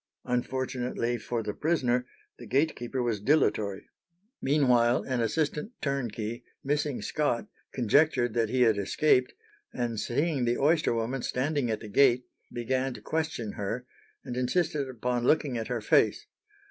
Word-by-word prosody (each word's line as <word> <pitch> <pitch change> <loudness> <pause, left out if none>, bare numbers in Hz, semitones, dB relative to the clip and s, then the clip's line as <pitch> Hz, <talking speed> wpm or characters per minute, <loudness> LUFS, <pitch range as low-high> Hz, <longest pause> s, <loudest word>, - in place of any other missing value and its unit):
Unfortunately 125 -1 -1
for 115 +1 -3
the 105 - -3
prisoner 125 -6 +1 0.3
the - - -10
gatekeeper 130 -3 0
was 115 -4 0
dilatory. 105 -6 +1 0.5
Meanwhile, 125 -4 +3
an 130 -3 -1
assistant 150 - -1
turnkey, 120 -4 -3 0.2
missing 145 -1 -1
Scott, 145 -6 -1 0.2
conjectured 125 0 +2
that 115 -2 +1
he 125 +1 +3
had 110 -3 +3
escaped, 125 +5 +2 0.4
and 120 -3 -2
seeing 140 +3 0
the 120 +1 +1
oyster 150 -3 +2
woman 120 +3 -2
standing 135 0 -1
at 110 -1 -2
the 110 - -8
gate, 125 +3 +4 0.3
began 130 +2 -1
to - - -10
question 155 -9 -2
her, 115 +6 -4 0.4
and 125 -3 -5
insisted 140 +2 0
upon 125 0 -2
looking 145 -1 +2
at 115 -1 -3
her 120 -3 -2
face. 105 - +3
125 Hz, 140 wpm, -28 LUFS, 120-140 Hz, 0.5 s, gate